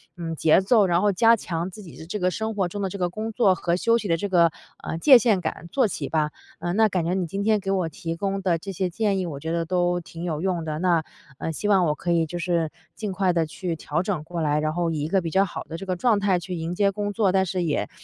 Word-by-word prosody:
嗯 165 Hz, -2 st, -4 dB
节 160 Hz, +3 st, +4 dB
奏， 205 Hz, +1 st, +4 dB
然 175 Hz, 0 st, +2 dB
后 205 Hz, 0 st, +3 dB
加 230 Hz, +4 st, +5 dB
强 170 Hz, -4 st, -4 dB
自 210 Hz, +3 st, -11 dB
己 170 Hz, -, -12 dB
的 160 Hz, -, -9 dB
这 210 Hz, +4 st, -4 dB
个 180 Hz, 0 st, +1 dB
生 220 Hz, +3 st, -3 dB
活 190 Hz, -3 st, 0 dB
中 205 Hz, +3 st, -5 dB
的 195 Hz, -, 0 dB, 0.2 s
工 215 Hz, +5 st, -5 dB
作 205 Hz, -5 st, +4 dB
和 170 Hz, -1 st, -1 dB
休 230 Hz, +5 st, +2 dB
息 225 Hz, -, -4 dB
的 165 Hz, -, +2 dB
这 200 Hz, +5 st, -3 dB
个， 170 Hz, -3 st, +5 dB, 0.3 s
呃 160 Hz, -, -4 dB
界 260 Hz, -, +8 dB
限 220 Hz, -5 st, +2 dB
感 160 Hz, 0 st, -4 dB
做 260 Hz, -5 st, +3 dB
起 -, -, -4 dB
吧。 155 Hz, -1 st, 0 dB, 0.3 s
呃 175 Hz, +1 st, -2 dB
那 220 Hz, +2 st, +4 dB
感 185 Hz, -4 st, -1 dB
觉 175 Hz, -, 0 dB
你 185 Hz, -2 st, -1 dB
今 195 Hz, +5 st, -3 dB
天 215 Hz, 0 st, +3 dB
给 195 Hz, -, -5 dB
我 185 Hz, -4 st, 0 dB
提 165 Hz, +2 st, -5 dB
供 195 Hz, +2 st, -2 dB
的 180 Hz, -3 st, +1 dB
这 195 Hz, +4 st, -7 dB
些 185 Hz, 0 st, -1 dB
建 200 Hz, +1 st, 0 dB
议， 185 Hz, -, -1 dB
我 150 Hz, -5 st, -5 dB
觉 160 Hz, +2 st, -3 dB
得 165 Hz, 0 st, -1 dB
都 175 Hz, 0 st, +1 dB
挺 165 Hz, 0 st, -9 dB
有 160 Hz, -3 st, -2 dB
用 180 Hz, -3 st, -1 dB
的。 155 Hz, -1 st, -4 dB
那 170 Hz, -2 st, +2 dB, 0.3 s
呃 165 Hz, -, -3 dB
希 185 Hz, +6 st, -3 dB
望 195 Hz, -3 st, +4 dB
我 150 Hz, -, +2 dB
可 175 Hz, +4 st, -3 dB
以 165 Hz, -1 st, +2 dB
就 175 Hz, +3 st, -5 dB
是 170 Hz, -3 st, 0 dB, 0.2 s
尽 210 Hz, -2 st, -4 dB
快 185 Hz, 0 st, +1 dB
地 165 Hz, -2 st, +1 dB
去 170 Hz, +2 st, -4 dB
调 155 Hz, +1 st, -2 dB
整 185 Hz, -5 st, -2 dB
过 170 Hz, +1 st, -5 dB
来， 150 Hz, -1 st, +1 dB
然 155 Hz, 0 st, -1 dB
后 175 Hz, 0 st, 0 dB
以 155 Hz, -2 st, -2 dB
一 -, -, -1 dB
个 190 Hz, +3 st, +2 dB
比 165 Hz, -, -3 dB
较 190 Hz, +4 st, +3 dB
好 185 Hz, -, -6 dB
的 165 Hz, -, -7 dB
这 195 Hz, -, -7 dB
个 185 Hz, -1 st, -1 dB
状 215 Hz, +3 st, +2 dB
态 195 Hz, -3 st, +2 dB
去 180 Hz, +1 st, -6 dB
迎 165 Hz, +1 st, -3 dB
接 200 Hz, +2 st, +2 dB
工 205 Hz, +1 st, -3 dB
作。 200 Hz, -3 st, +2 dB
但 190 Hz, 0 st, +2 dB
是 175 Hz, -, -4 dB
也 155 Hz, -4 st, -1 dB
180 Hz, 310 characters per minute, -24 LUFS, 165-200 Hz, 0.3 s, 界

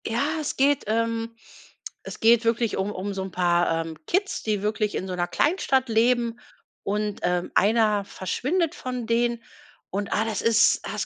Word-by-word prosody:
Ja, 280 Hz, +8 st, 0 dB
es 300 Hz, -, -4 dB
geht 280 Hz, +1 st, +2 dB
ähm, 230 Hz, +1 st, -1 dB, 0.7 s
es -, -, -8 dB
geht 230 Hz, +1 st, +5 dB
wirklich 230 Hz, -1 st, +1 dB
um 195 Hz, +2 st, -1 dB
um 200 Hz, +1 st, -4 dB
so 195 Hz, -, -4 dB
'n 190 Hz, -, -7 dB
paar, 175 Hz, -2 st, +1 dB
ähm, 160 Hz, -1 st, -8 dB
Kids, 390 Hz, +2 st, 0 dB
die 210 Hz, -2 st, -1 dB
wirklich 210 Hz, 0 st, -1 dB
in -, -, -2 dB
so 185 Hz, -, -4 dB
'ner 175 Hz, 0 st, -1 dB
Kleinstadt 275 Hz, -, +1 dB
leben 235 Hz, +1 st, +2 dB, 0.4 s
und, 210 Hz, 0 st, -2 dB
ähm, 175 Hz, 0 st, 0 dB
einer 210 Hz, -1 st, +3 dB
verschwindet 300 Hz, -, -1 dB
von 250 Hz, -2 st, -5 dB
denen. 235 Hz, 0 st, 0 dB, 0.5 s
Und, 200 Hz, +1 st, -3 dB
ah, 220 Hz, -, +1 dB
das 220 Hz, -3 st, -2 dB
ist 230 Hz, -1 st, +4 dB
das 210 Hz, -3 st, -3 dB
225 Hz, 175 wpm, -25 LUFS, 200-240 Hz, 0.7 s, geht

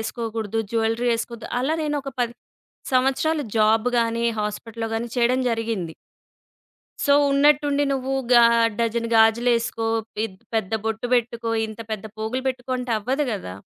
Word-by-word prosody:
ఏసుకోకూడదు, 225 Hz, -1 st, -3 dB
jewellery 225 Hz, +1 st, +1 dB
ఏసుకోద్దు. 230 Hz, 0 st, -6 dB
అలా 290 Hz, +5 st, 0 dB
నేను 295 Hz, -1 st, -1 dB
ఒక 275 Hz, -, -5 dB
10 240 Hz, -1 st, -1 dB, 0.6 s
సంవత్సరాలు 270 Hz, +4 st, +2 dB
జాబ్ 220 Hz, +2 st, +3 dB
గానీ, 230 Hz, 0 st, 0 dB, 0.2 s
హాస్పిటల్‌లో 225 Hz, +2 st, -4 dB
కానీ 235 Hz, +1 st, -3 dB
చేయడం 245 Hz, +2 st, +3 dB
జరిగింది. 225 Hz, -7 st, -2 dB, 1.1 s
సో, 280 Hz, -, +4 dB, 0.2 s
ఉన్నట్టుండి, 290 Hz, 0 st, +3 dB
"నువ్వు 265 Hz, 0 st, -2 dB, 0.2 s
గా 240 Hz, -1 st, +8 dB, 0.4 s
డజన 230 Hz, 0 st, 0 dB
గాజులు 225 Hz, +2 st, +4 dB
ఏసుకో, 230 Hz, -1 st, -3 dB, 0.4 s
ఇద్ 190 Hz, -4 st, -8 dB, 0.2 s
పెద్ద 220 Hz, -2 st, -1 dB
బొట్టు 225 Hz, +2 st, -2 dB
పెట్టుకో, 235 Hz, -1 st, -1 dB, 0.2 s
ఇంత 220 Hz, +1 st, -9 dB
పెద్ద 215 Hz, -2 st, -4 dB
పోగులు 220 Hz, +4 st, -2 dB
పెట్టుకో" 255 Hz, 0 st, -4 dB
అంటే, 250 Hz, -1 st, -3 dB
అవ్వదు 265 Hz, +7 st, -1 dB
గదా! 185 Hz, -, -5 dB
230 Hz, 140 wpm, -23 LUFS, 225-255 Hz, 1.1 s, గా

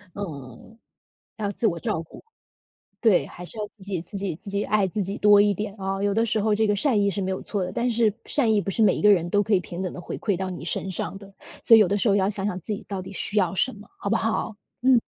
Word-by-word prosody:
嗯。 150 Hz, -, -8 dB, 0.6 s
要 205 Hz, -2 st, -2 dB
自 225 Hz, -, -3 dB
我 170 Hz, -5 st, +1 dB
照 160 Hz, -, -1 dB
顾， -, -, -14 dB, 0.8 s
对， 220 Hz, -7 st, +4 dB
还 180 Hz, -, -10 dB
是 225 Hz, -, -8 dB
要 210 Hz, -, -2 dB
自 200 Hz, -, -24 dB
己 190 Hz, -4 st, -3 dB
自 200 Hz, +3 st, -8 dB
己 190 Hz, -4 st, -3 dB
自 205 Hz, -, -8 dB
己 200 Hz, +1 st, -1 dB
爱 210 Hz, -2 st, +2 dB
自 205 Hz, +3 st, -3 dB
己 195 Hz, +2 st, -3 dB
多 205 Hz, -1 st, +6 dB
一 205 Hz, 0 st, +3 dB
点 205 Hz, +1 st, -4 dB
啊。 195 Hz, +1 st, -2 dB
有 205 Hz, -, +2 dB
的 225 Hz, +2 st, +2 dB
时 220 Hz, -1 st, 0 dB
候 215 Hz, 0 st, +2 dB
这 220 Hz, +1 st, +2 dB
个 205 Hz, -, +2 dB
善 210 Hz, 0 st, +2 dB
意 200 Hz, -, +3 dB
是 200 Hz, -, -3 dB
没 190 Hz, 0 st, -1 dB
有 190 Hz, -, -3 dB
错 200 Hz, -3 st, -3 dB
的， 180 Hz, -, -4 dB
但 240 Hz, +6 st, 0 dB
是 225 Hz, -3 st, +2 dB
善 235 Hz, -7 st, +2 dB
意 210 Hz, -, +3 dB
不 200 Hz, -, -4 dB
是 210 Hz, +4 st, -1 dB
每 200 Hz, -, +5 dB
一 -, -, -4 dB
个 210 Hz, -, +7 dB
人 175 Hz, -3 st, +2 dB
都 205 Hz, -, +3 dB
可 205 Hz, +1 st, 0 dB
以 185 Hz, -, +5 dB
平 175 Hz, 0 st, -7 dB
等 185 Hz, -, -2 dB
地 -, -, -8 dB
回 -, -, -6 dB
馈 200 Hz, -5 st, -1 dB
到 190 Hz, 0 st, -3 dB
你 175 Hz, -3 st, -7 dB
身 190 Hz, -, -2 dB
上 190 Hz, +2 st, -4 dB
的。 195 Hz, 0 st, -14 dB, 0.3 s
所 230 Hz, -, +8 dB
以 225 Hz, -, +8 dB
有 205 Hz, -, +5 dB
的 200 Hz, -, +1 dB
时 210 Hz, +2 st, +1 dB
候 200 Hz, -, +4 dB
要 195 Hz, 0 st, +2 dB
想 200 Hz, -2 st, -3 dB
想 185 Hz, -3 st, -2 dB
自 210 Hz, -, -4 dB
己 200 Hz, -, -7 dB
到 195 Hz, -2 st, -3 dB
底 190 Hz, +2 st, -9 dB
需 210 Hz, +2 st, -3 dB
要 185 Hz, -2 st, +2 dB
什 260 Hz, -, +1 dB
么， 210 Hz, 0 st, -13 dB
好 200 Hz, -, -4 dB
不 225 Hz, -, +2 dB
好？ 225 Hz, 0 st, -1 dB, 0.3 s
嗯。 255 Hz, -2 st, +5 dB
200 Hz, 315 characters per minute, -25 LUFS, 190-215 Hz, 0.8 s, 所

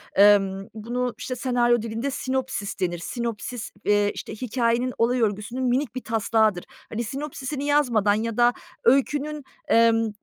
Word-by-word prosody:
emm, 195 Hz, -1 st, +4 dB
bunu, 240 Hz, +3 st, -3 dB
işte, 255 Hz, -, -4 dB
senaryo 240 Hz, -2 st, +2 dB
dilinde 230 Hz, +5 st, -3 dB
sinopsis 260 Hz, -6 st, -3 dB
denir. 175 Hz, -2 st, -1 dB
Sinopsis, 235 Hz, +3 st, -4 dB
eee, 205 Hz, 0 st, +3 dB
işte, -, -, -7 dB
hikâyenin 245 Hz, +1 st, 0 dB
olay 245 Hz, +1 st, +2 dB
örgüsünün 215 Hz, +4 st, -1 dB
minik 255 Hz, 0 st, 0 dB
bir 255 Hz, -, -4 dB
taslağıdır. 220 Hz, -3 st, +1 dB, 0.2 s
Hani, 225 Hz, +2 st, -3 dB
sinopsis'ini 275 Hz, +2 st, -5 dB
yazmadan 245 Hz, -9 st, +3 dB
ya 225 Hz, +1 st, -2 dB
da 240 Hz, 0 st, +5 dB, 0.3 s
öykünün, 290 Hz, +4 st, +2 dB, 0.2 s
emm, 225 Hz, -1 st, +4 dB
235 Hz, 135 wpm, -24 LUFS, 215-255 Hz, 0.3 s, da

